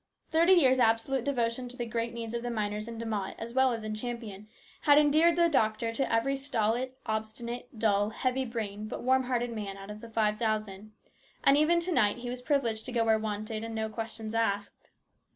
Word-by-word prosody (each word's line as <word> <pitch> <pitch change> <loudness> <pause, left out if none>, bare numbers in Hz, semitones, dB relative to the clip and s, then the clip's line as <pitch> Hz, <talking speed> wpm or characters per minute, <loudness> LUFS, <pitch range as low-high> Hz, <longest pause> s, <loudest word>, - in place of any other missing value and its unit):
Thirty 335 +3 +5
years' 260 -7 +5
absolute 230 +2 +2
devotion 245 -2 -1
to 250 - -8
the 240 - -2
great 230 0 -2
needs 230 -1 -6
of 235 - -2
the 245 - -3
miners 210 -1 -2
in 230 -1 -7
De 230 - -5
Mott 210 -4 -3
as 230 +1 -6
well 260 0 +4
as 225 -2 -3
in 215 0 -3
Champion 215 -3 -6 0.3
had 290 -2 +6
endeared 310 +3 +5
the 340 0 +4
doctor 225 -6 +1
to 270 +3 -1
every 230 +5 +2
stolid, 255 -2 -1
obstinate, 225 +3 -4
dull, 205 -2 +2
heavy 255 +4 -1
brained 215 -3 -5
but - - -5
warm 260 +1 +3
hearted 245 -1 -1
man 200 -3 -5
out 195 +1 -9
of 210 0 -9
the 230 - -10
five 215 -1 +1
thousand, 215 -2 -2 0.5
and 275 - +6
even 310 +4 +4
to 355 +2 0
night 215 -9 +3
he 245 0 -5
was 250 0 -5
privileged 245 -6 0
to - - -4
go 230 -2 +1
where 220 -1 +3
wanted 215 +1 -4
and 225 0 -5
no 220 0 -2
questions 225 0 -5
asked. 205 -3 -2
230 Hz, 210 wpm, -29 LUFS, 215-255 Hz, 0.5 s, had